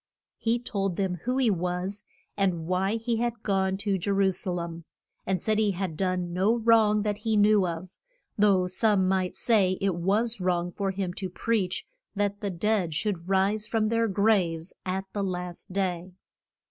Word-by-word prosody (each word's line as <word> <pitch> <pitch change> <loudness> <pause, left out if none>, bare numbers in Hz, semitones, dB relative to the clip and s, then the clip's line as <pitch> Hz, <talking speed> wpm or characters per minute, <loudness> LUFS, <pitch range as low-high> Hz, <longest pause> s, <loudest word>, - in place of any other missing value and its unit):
He 230 +1 +1
told 195 -6 -2
them 190 -1 0
who 250 +1 0
he 250 -5 +3
was, 180 +3 -2 0.3
and 180 -5 0
why 185 +4 0
he 230 0 -1
had 235 -1 -2
gone 190 -1 +1
to 195 -2 +1
Je 190 - -3
ru 195 -1 +3
sa 185 +1 -2
lem, 170 -1 -4 0.4
and 190 -1 +1
said 215 +4 +1
he 210 -2 +2
had 180 -3 -3
done 180 -1 -1
no 200 +6 +2
wrong 220 -2 +4
that 210 -1 -1
he 220 0 0
knew 205 -2 +4
of; 175 +2 -6 0.4
though 200 -3 +4
some 190 +1 +2
might 185 -1 0
say 195 -5 +2
it 195 -1 +1
was 205 +7 0
wrong 175 -1 0
for 195 +1 -2
him 190 -2 -3
to 190 0 -4
preach 195 -1 -1 0.3
that 205 0 -1
the 205 - -1
dead 185 -2 0
should 185 0 -2
rise 200 +2 +2
from 220 -2 +1
their 230 0 +2
graves 190 -5 +1
at 190 +1 -2
the 205 - -2
last 180 0 -5
day. 185 -2 -2
195 Hz, 180 wpm, -27 LUFS, 180-215 Hz, 0.4 s, wrong